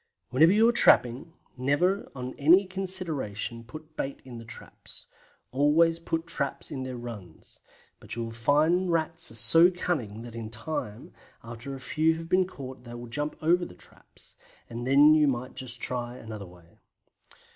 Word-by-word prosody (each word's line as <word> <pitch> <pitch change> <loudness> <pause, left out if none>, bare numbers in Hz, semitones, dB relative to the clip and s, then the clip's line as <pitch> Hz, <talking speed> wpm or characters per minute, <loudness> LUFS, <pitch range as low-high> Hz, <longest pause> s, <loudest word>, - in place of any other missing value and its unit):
Whenever 155 +7 +5
you 220 +3 +5
are - - +5
trapping, 130 - +4 0.2
never 145 +10 0
on 125 -1 -6
any 175 +7 +6
consideration 170 - -3
put 155 +6 -12
bait 135 -2 -4
on 120 -2 -8
the - - -10
traps; 115 - -10 0.5
always 160 +5 +3
put 165 0 -3
traps 140 -4 -1
in 135 - -4
their 130 -1 -5
runs, 105 -9 -10 0.4
but - - -7
you 115 - -3
will 115 - -6
find 155 +10 +2
Rats 165 0 0
are 115 - -6
so 165 +9 +6
cunning 130 - -3
that 120 -1 -10
in 115 -1 -6
time, 110 -2 -6 0.3
after 115 +4 -8
a - - -9
few 160 +4 +1
have 165 0 -8
been 185 0 +3
caught, 130 -7 -10
they 120 -1 -10
will 120 0 -8
jump 145 +6 -4
over 175 +3 +3
the 130 - -8
traps, - - -16 0.4
and 120 +1 -5
then 145 +3 +7
you 155 -1 +4
must 125 -1 -3
try 120 0 -3
another 110 -4 -8
way. 85 -1 -19
135 Hz, 165 wpm, -27 LUFS, 120-165 Hz, 0.5 s, then